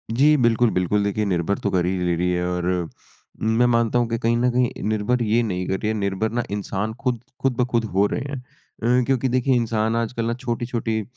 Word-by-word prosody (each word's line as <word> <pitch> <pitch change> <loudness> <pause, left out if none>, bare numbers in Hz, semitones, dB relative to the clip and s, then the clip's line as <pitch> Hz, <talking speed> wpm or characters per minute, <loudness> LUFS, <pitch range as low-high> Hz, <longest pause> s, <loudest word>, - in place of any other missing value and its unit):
जी, 150 +5 +5
बिल्कुल, 120 -2 +3
बिल्कुल, 90 +3 +1
देखिए, 100 +1 0
निर्भर 95 0 0
तो 100 - -1
कर 90 -2 +1
ही 95 +1 0
ले 90 - +1
रही 90 +2 0
है 90 0 0
और 90 -1 -2 0.8
मैं 110 +2 +3
मानता 115 0 +2
हूँ 120 - +1
कि 115 - 0
कहीं 115 +1 +1
न 125 +1 +2
कहीं 125 0 0
निर्भर 110 +3 0
ये 115 +2 +2
नहीं 90 -4 -2
कर 95 - -1
रही 105 - -2
है, 110 - +1
निर्भर 100 +1 -1
ना, 120 +1 -1
इंसान 105 +1 -3
खुद 125 -3 0 0.2
खुद-ब-खुद 125 -3 +1
हो 100 +2 +4
रहे - - -1
हैं। 140 - -4 0.6
अ, - - +2
क्योंकि 135 0 +1
देखिए, 130 +1 +2
इंसान 115 -1 0
आजकल 115 0 -1
ना 115 - 0
छोटी-छोटी 120 -2 -2
115 Hz, 215 wpm, -23 LUFS, 100-120 Hz, 0.8 s, जी